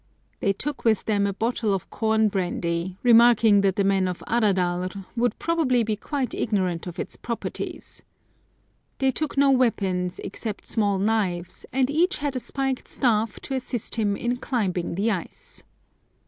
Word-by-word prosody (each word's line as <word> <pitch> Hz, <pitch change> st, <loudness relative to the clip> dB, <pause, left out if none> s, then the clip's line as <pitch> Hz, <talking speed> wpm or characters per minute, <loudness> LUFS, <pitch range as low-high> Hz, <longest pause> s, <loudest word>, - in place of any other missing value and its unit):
They 200 Hz, -, +2 dB
took 280 Hz, +8 st, -4 dB
with 220 Hz, -3 st, +2 dB
them 205 Hz, -2 st, +1 dB
a 200 Hz, -, -2 dB
bottle 220 Hz, -1 st, 0 dB
of 190 Hz, -, -7 dB
com 220 Hz, -1 st, +2 dB
brandy, 180 Hz, -2 st, -2 dB
remarking 230 Hz, -3 st, +6 dB
that 195 Hz, -2 st, +2 dB
the 200 Hz, -, +1 dB
men 195 Hz, -1 st, +2 dB
of 180 Hz, -1 st, -5 dB
Aradalr 185 Hz, -4 st, 0 dB
would 240 Hz, -2 st, +1 dB
probably 300 Hz, -8 st, +1 dB
be 220 Hz, -1 st, -1 dB
quite 265 Hz, +4 st, -3 dB
ignorant 185 Hz, -6 st, -1 dB
of 175 Hz, -, -7 dB
its -, -, -5 dB
properties. 235 Hz, -1 st, -5 dB, 1.0 s
They 265 Hz, -1 st, +2 dB
took 300 Hz, +2 st, -3 dB
no 280 Hz, 0 st, +5 dB
weapons, 190 Hz, -8 st, +1 dB
except 210 Hz, +1 st, -5 dB
small 205 Hz, -3 st, +1 dB
knives, 190 Hz, -4 st, -1 dB
and 260 Hz, -1 st, +2 dB
each 345 Hz, +5 st, +2 dB
had 285 Hz, -2 st, -2 dB
a -, -, 0 dB
spiked 270 Hz, 0 st, -3 dB
staff, 225 Hz, -4 st, 0 dB
to 275 Hz, -, -5 dB
assist 250 Hz, -3 st, -2 dB
him 210 Hz, -3 st, +1 dB
in 240 Hz, +4 st, -1 dB
climbing 190 Hz, -10 st, -2 dB
the 210 Hz, +5 st, +1 dB
ice. 185 Hz, -5 st, -6 dB
215 Hz, 160 wpm, -25 LUFS, 190-245 Hz, 1.0 s, remarking